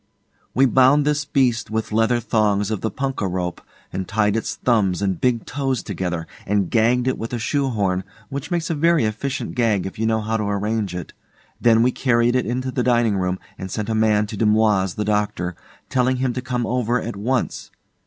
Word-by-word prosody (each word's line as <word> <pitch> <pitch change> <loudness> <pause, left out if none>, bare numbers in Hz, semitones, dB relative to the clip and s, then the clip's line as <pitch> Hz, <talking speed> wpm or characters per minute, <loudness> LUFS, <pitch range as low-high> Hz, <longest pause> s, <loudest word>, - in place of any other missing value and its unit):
We 135 - +5
bound 135 +3 +5
this 150 -1 +1
beast 125 -5 +1
with 110 0 -2
leather 115 +2 +2
thongs 105 -3 +1
of 110 - -2
the 110 - 0
punkah 135 -7 -2
rope, 90 -1 -3 0.3
and 95 -1 -3
tied 105 0 +1
its 115 - -2
thumbs 100 -7 +1
and 95 -4 -1
big 120 -3 +1
toes 135 -3 -2
together, 90 -4 -3 0.2
and 100 -3 +1
gagged 120 +2 +3
it 130 - 0
with 115 +2 -5
a - - 0
shoe 135 +4 0
horn, 95 -5 0 0.3
which 140 0 -5
makes 170 -1 -1
a - - +1
very 160 -3 +3
efficient 130 +6 -3
gag 110 -6 +1
if 95 - -7
you 110 - +1
know 110 0 +2
how 110 +1 -1
to 105 - -2
arrange 100 -1 -1
it. 90 -3 -6 0.5
Then 115 -1 +5
we 125 - +3
carried 120 -1 +2
it 125 - +1
into 130 +2 -2
the 125 - -1
dining 120 -3 +2
room, 90 0 -1 0.2
and 95 - -5
sent 105 +2 -3
a - - 0
man 110 -1 +3
to 105 - -7
Dumoise, 105 -3 +2
the 105 - -2
doctor, 105 -4 -1 0.3
telling 130 -1 +1
him 130 -1 0
to 125 - -3
come 125 -2 -2
over 125 0 0
at 115 -1 -5
once. 125 +6 -2
115 Hz, 205 wpm, -22 LUFS, 105-125 Hz, 0.5 s, We